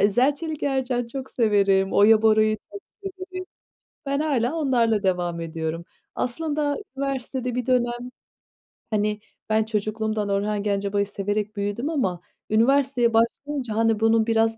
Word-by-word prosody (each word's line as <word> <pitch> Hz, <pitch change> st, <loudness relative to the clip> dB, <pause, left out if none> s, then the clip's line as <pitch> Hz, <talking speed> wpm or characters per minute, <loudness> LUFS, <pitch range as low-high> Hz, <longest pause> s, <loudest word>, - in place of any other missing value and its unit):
İzel-Çelik-Ercan 265 Hz, -, +1 dB
çok 265 Hz, +2 st, -7 dB
severim. 200 Hz, -4 st, +2 dB
Oya 215 Hz, +2 st, +6 dB
Bora'yı 215 Hz, 0 st, +4 dB, 0.2 s
çok 405 Hz, -, -7 dB, 0.2 s
severim. 370 Hz, -1 st, -7 dB, 0.6 s
Ben 280 Hz, +1 st, 0 dB
hâlâ 280 Hz, -2 st, 0 dB
onlarla 235 Hz, -8 st, +2 dB
devam 175 Hz, -2 st, 0 dB
ediyorum. 165 Hz, 0 st, -4 dB, 0.3 s
Aslında 290 Hz, +2 st, -1 dB, 0.2 s
üniversitede 260 Hz, -2 st, -3 dB
bir 250 Hz, -1 st, -2 dB
dönem, 245 Hz, -1 st, 0 dB, 0.8 s
hani 210 Hz, -1 st, 0 dB, 0.3 s
-ben 220 Hz, 0 st, +2 dB
çocukluğumdan 215 Hz, -1 st, -2 dB
Orhan 200 Hz, +1 st, 0 dB
Gencebay'ı 200 Hz, 0 st, 0 dB
severek 205 Hz, +1 st, -3 dB
büyüdüm 205 Hz, +8 st, -2 dB
ama, 190 Hz, -, -1 dB, 0.3 s
üniversiteye 245 Hz, +1 st, +3 dB
başlayınca, 235 Hz, +1 st, 0 dB
hani, 225 Hz, -1 st, +2 dB
bunun 225 Hz, 0 st, +3 dB
biraz 225 Hz, 0 st, +2 dB
225 Hz, 120 wpm, -24 LUFS, 205-265 Hz, 0.8 s, Oya